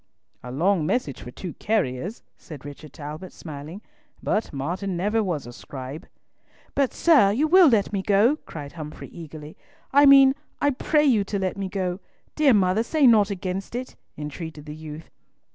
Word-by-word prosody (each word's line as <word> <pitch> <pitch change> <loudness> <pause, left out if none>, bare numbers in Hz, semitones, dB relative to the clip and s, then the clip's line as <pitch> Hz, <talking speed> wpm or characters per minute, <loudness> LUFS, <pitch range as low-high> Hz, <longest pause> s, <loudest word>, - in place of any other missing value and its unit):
"A 125 - -8
long 170 +5 +2
message 150 - -1
for - - -8
two 175 +7 -7
carriers," 195 - -1
said 145 -5 -11
Richard 145 +1 -10
Talbot, 155 +4 -8
smiling, 155 +6 -9 0.4
"but 215 - 0
Martin 175 +7 -3
never 210 +5 +1
was 170 - -2
a 120 - -9
scribe!" 135 +4 -8 0.7
"But, 275 -2 +1
sir, 285 -13 +5
you 275 +9 +1
will 365 +1 +7
let 210 -4 +2
me 195 - 0
go," 210 +9 +3
cried 145 -3 -7
Humfrey, 155 -2 -8
eagerly. 155 -2 -10 0.4
"I 285 +1 +7
mean, 275 -1 +8 0.3
I 285 - +2
pray 300 +3 +2
you 230 -8 +4
to 200 - -2
let 190 -1 -1
me 195 -1 -4
go. 185 -1 -2 0.4
Dear 285 -6 +5
mother, 190 +1 +3
say 290 +5 +2
nought 215 -4 +6
against 190 +2 -4
it," 255 +1 -5 0.2
entreated 150 +1 -7
the 150 - -7
youth. 155 0 -10
185 Hz, 170 wpm, -24 LUFS, 150-225 Hz, 0.7 s, mean